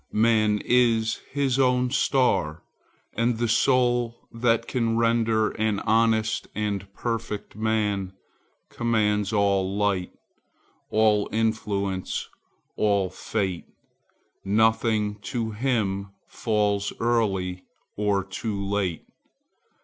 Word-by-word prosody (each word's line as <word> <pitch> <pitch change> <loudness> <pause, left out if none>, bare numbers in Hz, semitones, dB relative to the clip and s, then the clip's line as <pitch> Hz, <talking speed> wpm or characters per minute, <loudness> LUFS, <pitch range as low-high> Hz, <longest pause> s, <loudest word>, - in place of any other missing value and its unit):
"Man 110 -1 +3
is 115 -3 +2
his 135 -2 0
own 125 -1 +2
star; 100 - +1 0.5
and 115 0 0
the 120 +1 0
soul 120 0 +1
that 115 0 +1
can 115 -3 0
Render 115 -1 +2
an 110 -2 -1
honest 110 0 +1
and 105 -2 -1
a - - -15
perfect 115 0 -4
man, 105 -3 -1 0.6
Commands 105 -3 +1
all 100 -2 +1
light, 100 -3 0 0.8
all 105 -1 +2
influence, 105 -4 -1 0.5
all 100 -3 +1
fate; 95 -5 -3 0.8
Nothing 110 0 +1
to 115 +1 -3
him 105 -4 -1 0.2
falls 105 -2 0
early 95 -6 0 0.3
or 100 -2 +1
too 100 +2 -4
late. 100 -4 -2
110 Hz, 95 wpm, -25 LUFS, 100-115 Hz, 0.8 s, Man